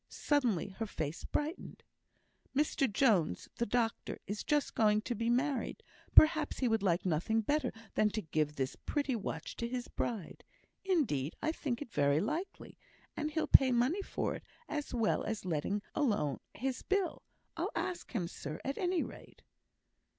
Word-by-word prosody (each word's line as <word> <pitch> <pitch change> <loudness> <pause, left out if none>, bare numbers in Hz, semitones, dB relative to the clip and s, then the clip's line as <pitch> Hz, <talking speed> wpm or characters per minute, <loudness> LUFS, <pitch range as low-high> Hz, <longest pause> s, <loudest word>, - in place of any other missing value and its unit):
Suddenly 245 - +1
her 225 - -1
face 155 -4 -4
brightened. 305 +5 -3 0.7
"Mr 280 -3 +2
Jones, 195 - +2
the 235 - 0
doctor, 230 +1 0
is 205 +2 -3
going 220 -8 +2
to 240 - -2
be 230 +1 -1
married, 255 0 0 0.3
perhaps 310 -1 +6
he 255 - +1
would 225 -2 +2
like 180 -2 +1
nothing 185 +7 +1
better 285 +3 +1 0.2
than 215 - +3
to 215 0 -3
give 155 -2 0
this 135 -1 -2
pretty 285 -4 -1
watch 170 -7 -4
to 235 - -2
his 245 0 -3
bride; 220 -8 -4 0.4
indeed, 240 - +1
and 310 - 0
I - - +3
think 280 -5 -3
it's 235 - -18
very 140 0 +3
likely; 330 - -4 0.4
and 300 - -1
he'll 315 +1 0
pay 265 -1 +7
money 250 +11 +2
for - - -2
it - - -7 0.2
as 295 -1 -3
well 230 -3 +1
as 220 -3 -3
letting 185 +5 -1
alone 205 - +1 0.2
his 260 +2 -2
bill. 390 -3 0 0.3
I'll - - -1
ask 360 - -3
him, 185 -8 -1
sir, 155 -2 -6
at 275 - -2
any 360 -1 +1
rate." - - -11
235 Hz, 165 wpm, -34 LUFS, 190-290 Hz, 0.7 s, pay